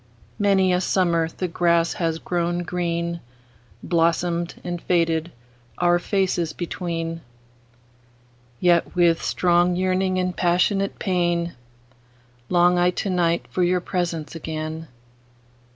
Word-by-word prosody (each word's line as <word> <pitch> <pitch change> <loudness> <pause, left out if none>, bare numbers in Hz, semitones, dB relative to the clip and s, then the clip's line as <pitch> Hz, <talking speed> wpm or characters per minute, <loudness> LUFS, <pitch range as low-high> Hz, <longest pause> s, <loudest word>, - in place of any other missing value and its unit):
Many 195 -2 +3
a 180 - +1
summer 170 -3 +1
the 180 +3 -4
grass 170 -1 +2
has 165 -2 -1
grown 175 +1 -1
green, 170 -1 -2 0.6
Blossomed 170 0 0
and 175 -1 -4
faded, 165 -1 +1 0.5
our 175 0 +3
faces 175 -4 0
between:Yet, 120 -4 -4
with 170 -2 +3
strong 175 0 +2
yearning 185 +1 0
and 180 -1 -1
passionate 185 +3 +1
pain, 175 -2 0 1.0
Long 175 0 +4
I 175 0 +4
to 190 +2 -2
night 170 -2 +1
for 185 - -1
your 180 +1 +3
presence 170 -4 -3
again. 160 0 -5
175 Hz, 105 wpm, -23 LUFS, 165-180 Hz, 1.0 s, Long